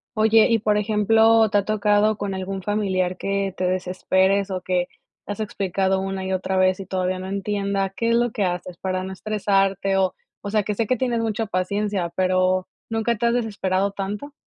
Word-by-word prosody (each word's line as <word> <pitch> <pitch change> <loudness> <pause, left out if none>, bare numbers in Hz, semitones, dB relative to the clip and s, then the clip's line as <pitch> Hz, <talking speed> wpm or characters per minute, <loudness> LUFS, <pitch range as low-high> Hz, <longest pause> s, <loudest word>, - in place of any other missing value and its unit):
Oye, 220 0 +5
y 230 -1 +3
por 210 0 +1
ejemplo, 220 +1 +4
¿te 205 - +2
ha - - -2
tocado 210 0 +2
con 200 -1 -3
algún 190 +1 -4
familiar 190 -2 0
que 195 -1 -2
te 185 - -2
desesperes, 190 +2 +1
o 185 - -2
que 180 -1 -1 0.4
le - - -5
has 205 - -5
explicado 190 -2 -1
una 195 0 -3
y 190 - -2
otra 190 0 -1
vez 185 0 +2
y - - -7
todavía 185 -1 -1
no 185 0 -6
entienda? 200 0 -1
¿Qué 230 - 0
es 230 - +3
lo 240 +1 +2
que 210 - -1
haces, 180 -1 -3
para 185 0 -2
no 190 - -6
estresarte? 195 -1 0
O 190 -1 +2 0.3
O 205 - -5
sea, 210 0 +1
que 210 +1 -3
sé 230 - 0
que 255 +4 0
tienes 240 -1 0
mucha 225 0 -1
paciencia, 200 -1 -1
pero, 185 0 +1 0.2
¿nunca 225 +1 0
te 230 - -2
has 235 - +3
desesperado 200 -4 0
tanto? 205 +9 -5
195 Hz, 205 wpm, -23 LUFS, 185-215 Hz, 0.4 s, Oye